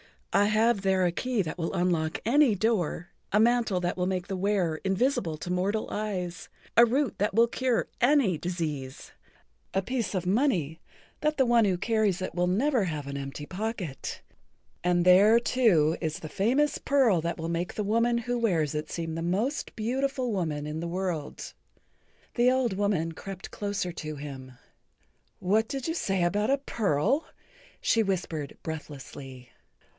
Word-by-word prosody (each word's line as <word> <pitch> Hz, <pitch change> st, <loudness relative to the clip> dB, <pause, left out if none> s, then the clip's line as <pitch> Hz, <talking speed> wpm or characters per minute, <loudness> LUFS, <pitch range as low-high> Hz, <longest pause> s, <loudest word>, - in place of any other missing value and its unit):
I 205 Hz, -, +5 dB
have 215 Hz, 0 st, +3 dB
there 190 Hz, -1 st, +2 dB
a 175 Hz, -, +2 dB
key 245 Hz, +4 st, -1 dB
that 160 Hz, -, -5 dB
will 165 Hz, -, -2 dB
unlock 175 Hz, -3 st, 0 dB
any 260 Hz, -1 st, +4 dB
door, 185 Hz, -5 st, 0 dB, 0.2 s
a 210 Hz, -, +5 dB
mantle 230 Hz, -4 st, +3 dB
that 175 Hz, +1 st, -1 dB
will 180 Hz, 0 st, 0 dB
make 185 Hz, -1 st, -1 dB
the[Pg -, -, -24 dB
55] 190 Hz, -1 st, -3 dB
wearer 185 Hz, -5 st, 0 dB
invisible 190 Hz, -, +1 dB
to 175 Hz, -, -5 dB
mortal 195 Hz, +4 st, 0 dB
eyes, 185 Hz, -5 st, -3 dB, 0.3 s
a 235 Hz, -, +8 dB
root 260 Hz, +2 st, 0 dB
that 205 Hz, 0 st, 0 dB
will 230 Hz, +1 st, +5 dB
cure 250 Hz, 0 st, 0 dB
any 245 Hz, -, +3 dB
disease, 150 Hz, -6 st, -4 dB, 0.6 s
a 195 Hz, -, +3 dB
piece 240 Hz, -2 st, -2 dB
of 185 Hz, -1 st, -1 dB
money 185 Hz, -, +1 dB, 0.4 s
that 305 Hz, 0 st, 0 dB
the 265 Hz, -, +4 dB
one 235 Hz, -2 st, +4 dB
who 190 Hz, -3 st, +1 dB
carries 215 Hz, -2 st, +1 dB
it 185 Hz, -, -4 dB
will 175 Hz, +1 st, +1 dB
never 235 Hz, +4 st, +2 dB
have 155 Hz, -4 st, -4 dB
an 140 Hz, 0 st, -4 dB
empty 140 Hz, +1 st, -6 dB
pocket, 185 Hz, -, -5 dB, 0.6 s
and 175 Hz, 0 st, +2 dB
there, 200 Hz, +5 st, +7 dB
too, 210 Hz, -11 st, +3 dB
is 160 Hz, -2 st, -2 dB
the 155 Hz, -, -7 dB
famous 255 Hz, -, +1 dB
pearl 260 Hz, -10 st, +3 dB
that 170 Hz, +1 st, -2 dB
will 165 Hz, 0 st, -4 dB
make 170 Hz, +1 st, -2 dB
the 210 Hz, -, -1 dB
woman 230 Hz, +3 st, +2 dB
who 245 Hz, +1 st, -2 dB
wears 170 Hz, -11 st, +1 dB
it 150 Hz, 0 st, -3 dB
seem 165 Hz, -1 st, -4 dB
the 165 Hz, -, -3 dB
most 205 Hz, -, -1 dB
beautiful 255 Hz, +2 st, -1 dB
woman 160 Hz, -7 st, -2 dB
in 150 Hz, +1 st, -4 dB
the 170 Hz, -, -3 dB
world." 175 Hz, -4 st, -4 dB, 0.8 s
The 245 Hz, 0 st, +4 dB
old 255 Hz, -4 st, +1 dB
woman 190 Hz, -5 st, 0 dB
crept 195 Hz, +3 st, -8 dB
closer 200 Hz, -3 st, -3 dB
to 155 Hz, -2 st, -6 dB
him. 135 Hz, -3 st, -8 dB, 0.9 s
"What 215 Hz, +4 st, +2 dB
did 270 Hz, +2 st, -4 dB
you -, -, 0 dB
say 195 Hz, -, 0 dB
about 205 Hz, +6 st, +1 dB
a 275 Hz, -, +4 dB
pearl?" 230 Hz, -, 0 dB, 0.5 s
she 225 Hz, -, +3 dB
whispered 170 Hz, -7 st, -3 dB
breathlessly. 135 Hz, -5 st, -8 dB
190 Hz, 170 wpm, -28 LUFS, 165-230 Hz, 0.9 s, a